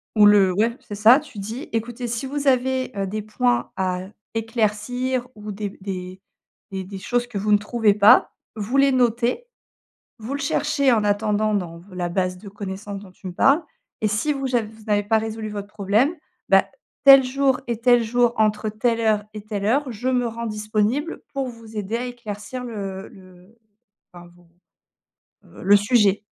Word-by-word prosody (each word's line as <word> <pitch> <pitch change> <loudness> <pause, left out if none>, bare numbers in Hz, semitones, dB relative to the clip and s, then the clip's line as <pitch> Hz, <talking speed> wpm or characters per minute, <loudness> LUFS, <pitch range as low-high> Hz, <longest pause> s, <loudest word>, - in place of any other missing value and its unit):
Ou 210 -1 +7
le 205 -2 +6
ouais 225 +5 +1
c'est 205 - -8
ça. 220 +6 +6
Tu 250 - -14
dis: 225 +9 -6
«Écoutez 240 +2 -3
si 235 +2 -3
vous 285 +1 -3
avez, 260 0 +1
heu, 195 - 0
des 215 +3 -3
points 240 +4 0
à 185 -1 -1 0.3
éclaircir 230 +3 -1
ou 210 0 -7
des 205 0 -4
b - - -15
des 185 -1 -6 0.5
des 190 -1 -4
des 195 +1 -8
choses 245 +4 -1
que 240 - -6
vous 210 +2 -1
ne 205 - +7
trouvez 215 0 +2
pas, 210 +5 +6 0.2
vous 220 +5 -2
les 275 0 +5
notez. 245 - +1 0.7
Vous 225 +5 -5
le 280 - -3
cherchez 285 -1 +1
en 220 -2 +2
attendant 210 +1 +1
dans 175 -5 -2
v 170 - -18
la 175 -1 -2
base 185 0 -1
de 200 +2 -11
connaissance» 200 0 -6
dont 190 - -14
tu 185 - -11
me 180 - -6
parles: 275 - +4 0.4
«et 215 - +2
si 215 +8 0
je 285 - -2
vous 265 -2 -2
aj 240 - +3
v - - -8
vous 220 0 -16
n'avez 205 -1 +2
pas 220 +2 +2
résolu 220 0 -5
votre 205 -1 -6
problème, 210 - +1 0.3
bah, - - +5 0.4
tel 275 -1 +10
jour 265 0 +1
et 235 -2 -2
tel 245 -1 +5
jour 240 +1 +2
entre 215 0 +1
telle 230 +2 0
heure 215 -2 +2
et 210 - -7
telle 205 -2 -4
heure, 265 +4 +1
je 235 +3 -5
me 250 -2 +1
rends 230 0 -5
disponible 215 +8 -1
pour 275 -2 -2
vous 230 -2 -10
aider 210 +2 -2
à 245 - -3
éclaircir 240 0 -7
le 195 -4 -6
le, 185 +3 -18 0.6
enfin, 175 -1 -12
vos 175 -1 -23 1.0
heu, - - -13
le 200 +1 +6
sujet». 205 -1 +2
215 Hz, 195 wpm, -22 LUFS, 205-245 Hz, 1.0 s, tel